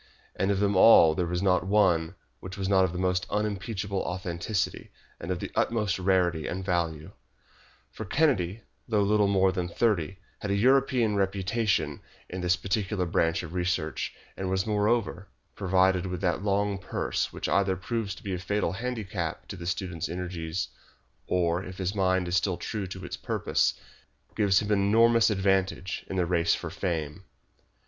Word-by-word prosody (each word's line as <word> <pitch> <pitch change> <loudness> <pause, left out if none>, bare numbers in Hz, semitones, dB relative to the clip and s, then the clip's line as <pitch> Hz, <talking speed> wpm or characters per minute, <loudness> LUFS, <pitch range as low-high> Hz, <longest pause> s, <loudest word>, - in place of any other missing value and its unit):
And 95 - 0
of 100 -1 +1
them 100 0 +1
all 95 -5 +8
there 85 +2 -1
was 90 +2 -2
not 95 -1 +2
one 95 -4 +2 0.2
which 95 0 -8
was 95 -1 -2
not 95 -1 +4
of 90 - -3
the 90 - -5
most 90 0 0
unimpeachable 105 -1 -2
authenticity, 90 +2 -3 0.3
and 85 - -7
of 90 - 0
the - - -6
utmost 105 -5 0
rarity 90 -4 +1
and 95 +1 -4
value; 85 -4 -1 0.8
for - - -7
Kennedy, 110 - +1 0.2
though 105 -3 +2
little 105 0 +3
more 95 -1 +3
than 90 -2 -2
thirty, 95 -2 0 0.2
had 105 - -5
a 100 - +1
European 125 -1 +3
reputation 100 +3 0 0.3
in 90 +1 -5
this 90 0 +3
particular 95 0 -1
branch 85 0 +1
of 85 -1 -8
research, 90 -5 -2 0.2
and 95 -1 -3
was, 95 0 0
moreover, 105 -2 0 0.3
provided 95 -1 +2
with 90 -1 -4
that 90 -2 0
long 100 0 0
purse 90 - -2
which - - -4
either 95 -1 +2
proves 100 +2 -3
to - - -14
be 100 - -3
a 90 - -3
fatal 100 +3 -1
handicap 100 -7 -4
to - - -5
the 85 -2 -7
student's 90 -3 -3
energies, 85 -1 -4 0.6
or, 90 0 +1
if 95 -1 -9
his 95 0 -2
mind 95 -2 +1
is 90 - -1
still 90 0 +1
true 105 -4 -4
to 95 0 -8
its - - -6
purpose, - - 0 0.6
gives 100 -1 +3
him 105 - -3
an 105 - +3
enormous 115 +3 +4
advantage 95 -2 0
in - - -5
the 90 -2 +1
race 85 -1 +2
for - - -6
fame. 80 -1 -3
95 Hz, 170 wpm, -27 LUFS, 90-100 Hz, 0.8 s, all